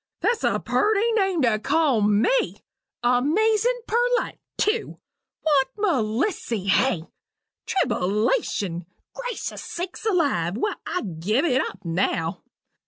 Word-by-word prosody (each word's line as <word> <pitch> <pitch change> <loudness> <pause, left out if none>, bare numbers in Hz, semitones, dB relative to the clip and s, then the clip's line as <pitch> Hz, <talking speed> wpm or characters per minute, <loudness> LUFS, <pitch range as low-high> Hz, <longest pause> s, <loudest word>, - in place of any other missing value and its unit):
That's 470 -1 +1
a - - +2
purty 435 +2 +2
name 385 -8 +1
to 220 -3 +2
call 285 -2 +2
me! 210 - +2 0.4
amazin' 425 - +2
perlite, 485 +2 +1 0.2
tew! 435 +2 0 0.5
Want 285 -4 +3
Melissy, 250 - 0
hey! 200 -4 +2 0.6
Tribbleation! 200 - 0 0.3
Gracious - - -5
sakes 355 +4 -6
alive! 285 - +1
Well, 420 - -2
I'll 360 - -2
give 205 - 0
it 260 -4 +3
up - - -6
now! 165 0 -1
290 Hz, 105 wpm, -24 LUFS, -, 0.6 s, Want